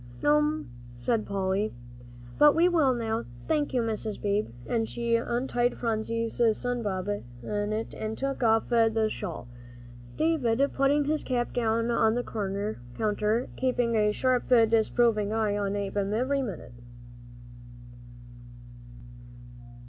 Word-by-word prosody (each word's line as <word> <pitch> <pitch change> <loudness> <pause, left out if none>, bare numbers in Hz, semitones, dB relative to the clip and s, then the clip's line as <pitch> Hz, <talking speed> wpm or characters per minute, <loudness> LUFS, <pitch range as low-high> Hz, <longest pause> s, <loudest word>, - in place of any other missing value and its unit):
"No'm," 150 -2 +2 0.3
said 215 - -1
Polly, 195 +2 -1 0.6
"but 295 -1 +7
we 335 +2 +5
will 310 -8 +3
now, 225 -1 -2 0.2
thank 300 -2 +1
you, 250 -2 +1
Mrs. 220 -1 -3
Beebe," 205 +1 0 0.2
and 225 -2 -1
she 235 -1 0
untied 240 +1 0
Phronsie's 230 0 -2 0.2
sun 245 -1 -2
bonnet 205 -1 -2 0.7
and 220 0 -4
took 275 0 -3
off 225 -1 +3
the 225 -2 +3
shawl, 155 -8 -6 0.7
David 280 -5 +2
putting 280 +2 +2
his 305 +1 0
cap 245 -2 -2
down 230 0 +1
on 225 -1 +3
the 245 - -1 0.7
counter, 215 +2 0
keeping 245 -2 0
a 210 -1 +3
sharp, 255 +3 0
disapproving 225 -2 +3
eye 215 -2 0
on 200 -1 -1
Ab'm 200 0 -2
every 270 +4 +1
minute. 195 - -6
230 Hz, 120 wpm, -28 LUFS, 210-245 Hz, 0.7 s, but